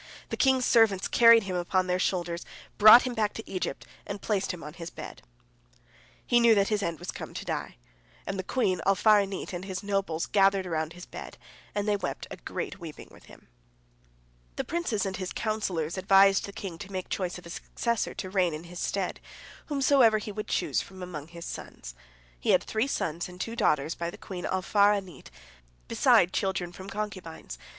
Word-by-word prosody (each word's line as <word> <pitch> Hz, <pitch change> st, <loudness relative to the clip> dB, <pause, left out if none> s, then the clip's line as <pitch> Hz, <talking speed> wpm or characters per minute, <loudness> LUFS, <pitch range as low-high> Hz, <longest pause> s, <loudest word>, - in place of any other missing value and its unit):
The -, -, -2 dB
king's 265 Hz, -2 st, +3 dB
servants 220 Hz, -5 st, +4 dB
carried 230 Hz, -1 st, +7 dB
him 190 Hz, -2 st, -4 dB
upon 180 Hz, +1 st, +1 dB
their 180 Hz, 0 st, 0 dB
shoulders, 175 Hz, -2 st, -1 dB, 0.4 s
brought 215 Hz, +4 st, +10 dB
him 255 Hz, -, -2 dB
back 215 Hz, -2 st, 0 dB
to 225 Hz, -, -7 dB
Egypt, 185 Hz, -, -4 dB, 0.2 s
and 200 Hz, 0 st, -5 dB
placed 200 Hz, -1 st, -1 dB
him 180 Hz, -3 st, -8 dB
on 150 Hz, +1 st, -8 dB
his 170 Hz, 0 st, -7 dB
bed. -, -, -9 dB, 1.0 s
He 240 Hz, -, +4 dB
knew 235 Hz, -1 st, +6 dB
that 200 Hz, -1 st, +2 dB
his 210 Hz, -1 st, 0 dB
end 170 Hz, -4 st, -2 dB
was -, -, -6 dB
come -, -, -8 dB
to -, -, -5 dB
die, -, -, -4 dB, 0.5 s
and 195 Hz, -1 st, -4 dB
the -, -, -2 dB
queen 185 Hz, -5 st, 0 dB
Alfar'anit 195 Hz, -1 st, +3 dB
and 175 Hz, +1 st, -4 dB
his 190 Hz, 0 st, -5 dB
nobles 195 Hz, -5 st, -1 dB
gathered 195 Hz, -1 st, +3 dB
about 160 Hz, -2 st, -2 dB
his 180 Hz, +1 st, -10 dB
bed, -, -, -9 dB, 0.4 s
and 205 Hz, 0 st, -1 dB
they 205 Hz, -1 st, +2 dB
wept -, -, -4 dB
a -, -, -6 dB
great 430 Hz, -, -5 dB
weeping 165 Hz, -4 st, -9 dB
with -, -, -17 dB
him. -, -, -17 dB, 1.1 s
The -, -, -2 dB
princes 320 Hz, -12 st, -1 dB
and 190 Hz, -1 st, -3 dB
his 185 Hz, -1 st, -4 dB
counsellors 190 Hz, -7 st, -2 dB
advised 195 Hz, +1 st, +5 dB
the 200 Hz, -, -8 dB
king 185 Hz, -4 st, -7 dB
to 200 Hz, -1 st, -9 dB
make 185 Hz, -1 st, -4 dB
choice 180 Hz, -4 st, -3 dB
of 180 Hz, -, -12 dB
a 170 Hz, -, -9 dB
successor, 235 Hz, +5 st, -2 dB
to 185 Hz, -, -5 dB
reign 180 Hz, -5 st, +2 dB
in 155 Hz, -, -8 dB
his 175 Hz, +1 st, -9 dB
stead, 195 Hz, -2 st, -2 dB, 0.5 s
whomsoever 270 Hz, -6 st, +4 dB
he 210 Hz, 0 st, -5 dB
would 210 Hz, +1 st, -5 dB
choose -, -, 0 dB
from 190 Hz, -1 st, -10 dB
among 155 Hz, -5 st, -7 dB
his 170 Hz, 0 st, -10 dB
sons. -, -, -8 dB, 0.5 s
He -, -, -3 dB
had -, -, +5 dB
three 220 Hz, +4 st, -1 dB
sons 170 Hz, -, -2 dB
and 180 Hz, 0 st, -12 dB
two 225 Hz, +4 st, -4 dB
daughters 155 Hz, -, +1 dB
by 170 Hz, 0 st, -4 dB
the -, -, -10 dB
queen 180 Hz, -2 st, -7 dB
Alfar'anit, 195 Hz, -3 st, +1 dB, 0.6 s
beside 175 Hz, -, +4 dB
children 190 Hz, -3 st, -1 dB
from 190 Hz, +2 st, -9 dB
concubines. 185 Hz, -, -6 dB
195 Hz, 190 wpm, -28 LUFS, 175-210 Hz, 1.1 s, brought